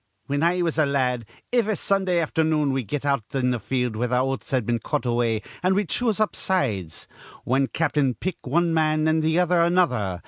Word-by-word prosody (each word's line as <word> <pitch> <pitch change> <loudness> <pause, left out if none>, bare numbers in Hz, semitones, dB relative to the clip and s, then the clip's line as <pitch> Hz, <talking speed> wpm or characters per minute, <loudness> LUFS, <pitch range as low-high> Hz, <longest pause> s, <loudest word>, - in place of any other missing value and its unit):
"Whin 145 +1 -1
I 175 +2 +2
was 165 -2 -1
a 155 - +4
la 140 0 0
ad, 125 -3 0 0.3
iv 240 -3 +2
a 215 - +1
Sundah 190 -4 +1
afthernoon 155 -2 +1
we'd 130 -5 -2
get 145 +5 -3
out 140 -5 +1
in 125 -1 +1
th' 120 -3 -2
field 125 -1 -1
where 120 +3 -1
th' 125 - -4
oats'd 130 -1 -1
been 120 +1 0
cut 150 +3 -3
away, 120 -2 0 0.2
an' 185 +1 +2
we'd 200 -3 0
choose 225 -4 0
up 215 - +1
sides. 105 - -2 0.4
Wan 135 +2 +2
cap'n'd 145 -5 0
pick 185 -7 -5
one 170 +5 +1
man, 155 -1 +2
an' 160 0 +2
th' 160 +1 +1
other 180 -1 +3
another. 125 - +1
145 Hz, 210 wpm, -24 LUFS, 125-170 Hz, 0.4 s, a